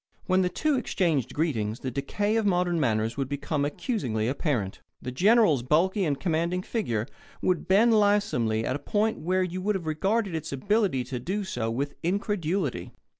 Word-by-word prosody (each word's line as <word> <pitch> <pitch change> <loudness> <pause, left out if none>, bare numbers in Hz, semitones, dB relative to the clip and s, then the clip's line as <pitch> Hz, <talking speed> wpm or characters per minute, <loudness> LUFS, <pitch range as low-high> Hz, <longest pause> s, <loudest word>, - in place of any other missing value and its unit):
When 185 0 +3
the 180 - +1
two 300 - 0
exchanged 165 - 0
greetings 115 -9 -1
the 130 - -3
decay 205 - -1
of 225 - +2
modern 180 -3 +1
manners 115 -3 0
would 135 -2 -2
become 145 +1 -2
accusingly 145 - -2
apparent. 125 - -2 0.2
The 125 - -5
General's 190 - +4
bulky 180 - +2
and 145 -3 -1
commanding 170 +1 0
figure 120 - -2 0.3
would 180 -3 0
bend 215 +5 +5
lissomely 205 - +2
at 130 - -1
a - - -3
point 220 +4 0
where 185 +3 +1
you 185 +1 -4
would 210 +2 0
have 180 -4 -4
regarded 190 +6 0
its 160 -1 -4
ability 185 - +1
to 125 0 -5
do 195 +11 -2
so 125 -12 -3
with 140 +5 -2
incredulity. 180 - -1
170 Hz, 175 wpm, -27 LUFS, 130-200 Hz, 0.3 s, bend